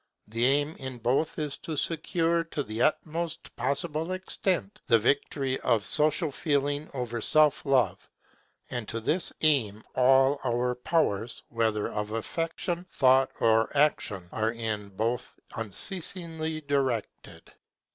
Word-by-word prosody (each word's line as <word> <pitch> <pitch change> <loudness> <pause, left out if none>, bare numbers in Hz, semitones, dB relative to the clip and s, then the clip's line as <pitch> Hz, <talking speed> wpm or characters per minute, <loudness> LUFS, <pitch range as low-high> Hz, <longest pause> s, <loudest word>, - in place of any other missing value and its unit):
The 115 +3 0
aim 145 +3 +1
in 130 -2 -6
both 125 +7 0
is 150 -2 -3
to 155 -2 -5
secure, 165 +2 0
to 150 -3 -3
the 110 0 -4
utmost 165 +3 -1
possible 160 +4 -1
extent, 185 - -2
the 115 - +6
victory 135 +2 0
of 110 -3 +1
Social 155 +1 +3
feeling 145 0 0
over 120 -2 -3
Self 155 +4 +5
love; 130 -3 +1 0.6
and 120 -4 -4
to 115 +1 -3
this 160 +11 0
aim 115 -9 +2
all 135 +2 +4
our 125 0 0
powers, 125 -4 -1
whether 110 -2 0
of 105 0 -4
affection, 165 - -3
thought, 130 0 +4
or 115 0 +3
action, 105 -11 +1
are 110 +1 0
in 110 -3 -3
both 115 +5 -3 0.2
unceasingly 160 - -3
directed. 135 -6 -3
135 Hz, 125 wpm, -28 LUFS, 115-155 Hz, 0.6 s, the